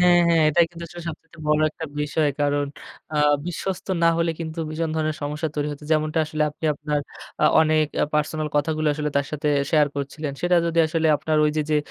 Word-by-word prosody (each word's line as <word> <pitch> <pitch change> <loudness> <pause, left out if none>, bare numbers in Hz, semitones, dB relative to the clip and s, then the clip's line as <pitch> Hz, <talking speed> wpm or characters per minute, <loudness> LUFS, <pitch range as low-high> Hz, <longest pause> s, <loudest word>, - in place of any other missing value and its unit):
হ্যাঁ, 175 -1 +6
হ্যাঁ, 165 -1 +4
এটাই 170 +2 +4
কিন্তু 170 0 -8
আসলে 175 +1 -9
সবচাইতে 165 +1 -10
বড় 150 0 +3
একটা 160 - -7 0.2
বিষয়। 150 +1 +1
কারণ 145 0 +1 0.5
আ - - 0 0.3
বিশ্বস্ত 180 +2 -4 0.2
না - - +6
হলে 170 0 +1
কিন্তু 160 0 -5
ভীষণ 160 +1 -2
ধরনের 155 -1 -1
সমস্যা 150 +2 -2
তৈরি 150 0 -1
হত। 145 - -10
যেমনটা 155 +1 +1
আসলে 155 0 -1
আপনি 150 - -11
আপনার 150 0 -2 0.4
আ - - +5 0.2
অনেক 155 -1 +3 0.3
পার্সোনাল 155 0 0
কথাগুলো 155 +1 0
আসলে 150 0 -2
তার 140 -1 +1
সাথে 150 0 -1 0.2
শেয়ার 150 -2 +4
করছিলেন। 140 +1 -4
সেটা 175 0 +3
যদি 170 0 -1
আসলে 160 0 0
আপনার 155 +1 -1
ওই 150 - +3
যে 155 - +2
যে 150 - +3
155 Hz, 200 wpm, -23 LUFS, 150-165 Hz, 0.5 s, হ্যাঁ